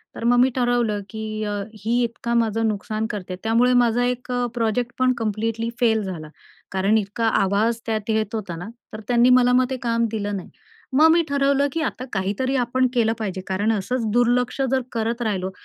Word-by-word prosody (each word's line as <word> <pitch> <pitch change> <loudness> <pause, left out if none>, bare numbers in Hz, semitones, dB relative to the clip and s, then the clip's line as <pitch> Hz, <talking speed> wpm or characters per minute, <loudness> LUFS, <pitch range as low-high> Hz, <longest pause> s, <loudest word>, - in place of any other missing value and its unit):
तर - - -7
मग 245 +1 +4
मी 255 +1 +5
ठरवलं, 240 -4 +1
की 215 -1 -5
अ, 205 0 -2 0.3
ही 235 +3 +1
इतकं 235 0 -3
माझं 225 0 0
नुकसान 215 +1 -2
करते, 185 -3 -5
त्यामुळे 235 +3 +3
माझा 240 +1 +1
एक 250 0 -3
अ, 245 0 0
प्रोजेक्ट 235 +1 -1
पण 255 0 +3
कम्प्लीटली 225 +1 -2
फेल 220 -3 +2
झाला, 170 -5 -6 0.4
कारण 195 +3 +2
इतका 215 +2 -1
आवाज 215 +4 +1
त्यात 220 -1 -3
येत 220 0 0
होता 190 -6 -4
ना, 175 +4 -7 0.3
तर 215 - -6
त्यांनी 245 0 +4
मला 250 0 +3
मग 255 0 +4
ते 260 - -2
काम 230 0 +2
दिलं 205 -2 -2
नाही. 185 - -9 0.4
मग 310 +4 +6
मी 335 +1 +5
ठरवलं, 280 0 +2
की 330 - -2
आता 255 -4 -3
काहीतरी 205 +8 -1
आपण 255 +2 +1
केलं 225 -2 +2
पाहिजे, 190 -4 -3
कारण 200 +4 0
असंच 225 +3 -1
दुर्लक्ष 245 +2 +2
जर 265 -1 +2
करत 230 +1 -2
राहिलो, 190 -4 -1
225 Hz, 190 wpm, -22 LUFS, 210-245 Hz, 0.4 s, मग